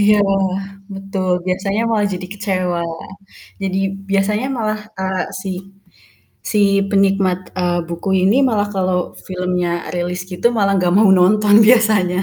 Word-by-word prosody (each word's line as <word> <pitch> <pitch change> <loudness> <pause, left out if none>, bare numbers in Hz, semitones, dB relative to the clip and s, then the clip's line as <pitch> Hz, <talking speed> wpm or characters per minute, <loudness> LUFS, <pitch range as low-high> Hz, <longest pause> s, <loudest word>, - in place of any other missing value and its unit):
Iya, 210 +1 +5 0.8
betul. 195 -1 -3 0.2
Biasanya 195 +3 -1
malah 210 -2 +1
jadi 180 0 -6
kecewa. 185 -4 -2 0.8
Jadi 190 0 -1 0.3
biasanya 210 +4 +1
malah, 215 -2 -2 0.2
eee, 190 -1 -1 0.2
si 195 - -5 1.0
si 210 - +1 0.3
penikmat, 195 -2 +2 0.2
eee, 175 -1 0
buku 170 +3 -5 0.2
ini 200 +5 +3
malah 205 -3 0
kalau 185 -1 0 0.3
filmnya 180 -1 -2 0.2
rilis 180 +1 -3
gitu, 180 +5 -1
malah 200 -2 +2
nggak 180 -1 +1
mau 210 0 +5
nonton 205 +3 +4
biasanya. 215 -6 +3
195 Hz, 130 wpm, -18 LUFS, 180-205 Hz, 1.0 s, Iya